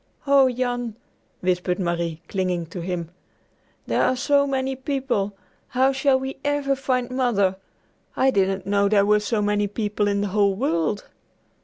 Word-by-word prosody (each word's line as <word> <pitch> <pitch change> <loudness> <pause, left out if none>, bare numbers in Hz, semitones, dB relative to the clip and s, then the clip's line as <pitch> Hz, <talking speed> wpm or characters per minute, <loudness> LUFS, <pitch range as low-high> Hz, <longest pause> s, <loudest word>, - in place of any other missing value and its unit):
"Oh, 275 -2 +5
Jan," 245 -2 -2 0.5
whispered 180 0 0
Marie 170 -2 -2
clinging 180 -3 -1
to 175 - -5
him, 170 -1 -4 0.7
"there - - +1
are 255 - +3
so 280 +2 +2
many 265 -1 -1
people! 255 -7 -2 0.3
How 260 +2 +2
shall 270 0 +2
we 265 +1 -5
ever 290 -1 +1
find 255 -2 -1
Mother? 225 -7 +1 0.6
I 265 0 +4
didn't 195 -3 0
know 200 0 +2
there 200 -1 +4
were 210 +1 +4
so 210 0 -1
many 205 0 +1
people 210 0 -1
in 200 0 +1
the 205 - -1
whole 200 0 +2
world." 190 - 0
210 Hz, 155 wpm, -23 LUFS, 195-260 Hz, 0.7 s, Oh